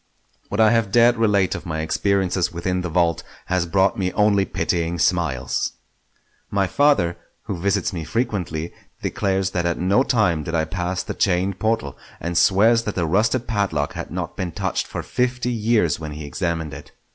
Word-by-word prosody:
What 100 Hz, -, -3 dB
I 110 Hz, -1 st, +6 dB
have 115 Hz, -4 st, +1 dB
dared 120 Hz, +2 st, +5 dB
relate 105 Hz, -4 st, +2 dB
of -, -, -5 dB
my 80 Hz, -1 st, -2 dB
experiences 95 Hz, +1 st, 0 dB
within 90 Hz, +2 st, -2 dB
the 90 Hz, -, -3 dB
vault 85 Hz, -1 st, +1 dB, 0.2 s
has 90 Hz, -1 st, 0 dB
brought 95 Hz, +4 st, +2 dB
me 90 Hz, -1 st, 0 dB
only 105 Hz, -2 st, +3 dB
pitying 85 Hz, -2 st, -1 dB
smiles. 80 Hz, -7 st, 0 dB, 0.8 s
My 100 Hz, -1 st, +1 dB
father, 95 Hz, -8 st, +2 dB, 0.3 s
who 100 Hz, -5 st, -5 dB
visits 100 Hz, +2 st, 0 dB
me 85 Hz, -3 st, -4 dB
frequently, 90 Hz, -5 st, -2 dB, 0.3 s
declares 95 Hz, -1 st, 0 dB
that 85 Hz, -3 st, 0 dB
at 85 Hz, -, -1 dB
no 95 Hz, +7 st, +3 dB
time 105 Hz, -, +2 dB
did 85 Hz, +3 st, -4 dB
I 80 Hz, -1 st, +1 dB
pass 90 Hz, +2 st, -3 dB
the -, -, -5 dB
chained 95 Hz, 0 st, 0 dB
portal, 110 Hz, -, -1 dB, 0.2 s
and 85 Hz, +1 st, -4 dB
swears 110 Hz, +7 st, +4 dB
that 105 Hz, -, -3 dB
the 85 Hz, -, 0 dB
rusted 110 Hz, +9 st, +1 dB
padlock 100 Hz, -10 st, -1 dB
had -, -, -6 dB
not -, -, -4 dB
been 90 Hz, -3 st, -4 dB
touched -, -, -2 dB
for -, -, -5 dB
fifty 125 Hz, 0 st, -1 dB
years 110 Hz, -8 st, +1 dB
when 75 Hz, -2 st, -6 dB
he 75 Hz, 0 st, -7 dB
examined 80 Hz, +1 st, -3 dB
it. -, -, -11 dB
95 Hz, 180 wpm, -22 LUFS, 85-105 Hz, 0.8 s, I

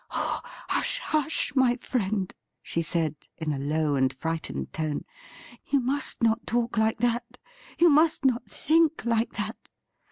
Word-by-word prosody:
' -, -, -42 dB
Oh, -, -, -2 dB, 0.3 s
hush, -, -, +1 dB
hush, 310 Hz, -, 0 dB
my 255 Hz, -2 st, +4 dB
friend 210 Hz, -6 st, -2 dB
!' -, -, -56 dB
she 165 Hz, -, -1 dB
said, 160 Hz, -2 st, +1 dB, 0.2 s
in 155 Hz, -2 st, -2 dB
a 135 Hz, -, -3 dB
low 150 Hz, +1 st, 0 dB
and 130 Hz, -1 st, +2 dB
frightened 130 Hz, -, -4 dB
tone; 155 Hz, -2 st, -2 dB, 0.3 s
' -, -, -18 dB
you 280 Hz, -, +4 dB
must 265 Hz, 0 st, -1 dB
not 225 Hz, +1 st, +2 dB
talk 240 Hz, 0 st, 0 dB
like 220 Hz, 0 st, +2 dB
that; 240 Hz, +1 st, -1 dB, 0.4 s
you 345 Hz, -, +6 dB
must 310 Hz, -1 st, +4 dB
not 250 Hz, -2 st, +1 dB
think 320 Hz, -1 st, +2 dB
like 230 Hz, 0 st, +1 dB
that.' -, -, -5 dB
230 Hz, 165 wpm, -27 LUFS, 160-270 Hz, 0.4 s, you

